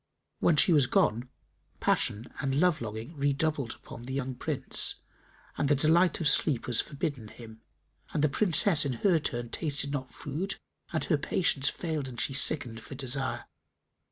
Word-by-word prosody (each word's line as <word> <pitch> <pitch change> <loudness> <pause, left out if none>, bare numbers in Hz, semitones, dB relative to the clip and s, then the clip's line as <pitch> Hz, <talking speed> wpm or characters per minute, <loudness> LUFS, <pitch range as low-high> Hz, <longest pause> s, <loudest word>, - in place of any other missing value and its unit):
When 170 - +3
she 170 +4 +5
was 145 -5 +4
gone, 120 +2 +1 0.5
passion 110 +4 -1
and 135 0 -1
love 175 -2 +2
longing 110 +7 -6
redoubled 140 -2 -1
upon 120 - -12
the 130 +2 -6
young 130 -1 -3
Prince 125 - -1 0.6
and 145 - +1
the 145 - +4
delight 160 +5 +4
of 165 - +1
sleep 145 -3 +4
was 120 -4 +2
forbidden 140 -5 -5
him, 110 0 -13 0.5
and 150 - -1
the - - +5
Princess 175 0 +4
in 140 -3 -2
her 170 - +2
turn 120 -5 -3
tasted 145 -1 -2
not 130 -2 -4
food 160 +8 -4 0.4
and 160 - -1
her 155 -4 +1
patience 145 -3 +1
failed 155 -5 -4
and 125 -2 -8
she 135 - 0
sickened 130 -4 +2
for 125 - -10
desire. 130 0 -3
140 Hz, 165 wpm, -29 LUFS, 125-155 Hz, 0.6 s, she